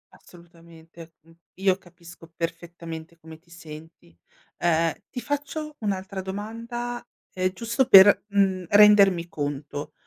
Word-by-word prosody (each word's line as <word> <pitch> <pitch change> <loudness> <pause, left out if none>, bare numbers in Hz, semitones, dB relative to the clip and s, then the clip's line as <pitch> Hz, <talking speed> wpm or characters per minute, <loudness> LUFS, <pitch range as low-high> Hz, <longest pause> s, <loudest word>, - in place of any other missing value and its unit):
Assolutamente, 170 -1 -17
mh. 165 +1 -23 0.2
Io 190 0 +1
capisco 175 -2 -16
perfettamente 165 -1 -7
come 160 0 -14
ti 170 +1 -32
senti. 160 - -13 0.4
Ehm, 165 -1 +1 0.2
ti 250 - -6
faccio 290 +3 -5
un'altra 195 -2 -4
domanda, 230 +5 -6 0.3
ehm, 185 0 -1
giusto 235 +6 -1
per, 195 -3 +8
uhm, 195 -2 +1
rendermi 200 -4 +5
conto. 145 -2 -6
175 Hz, 115 wpm, -24 LUFS, 165-205 Hz, 0.4 s, per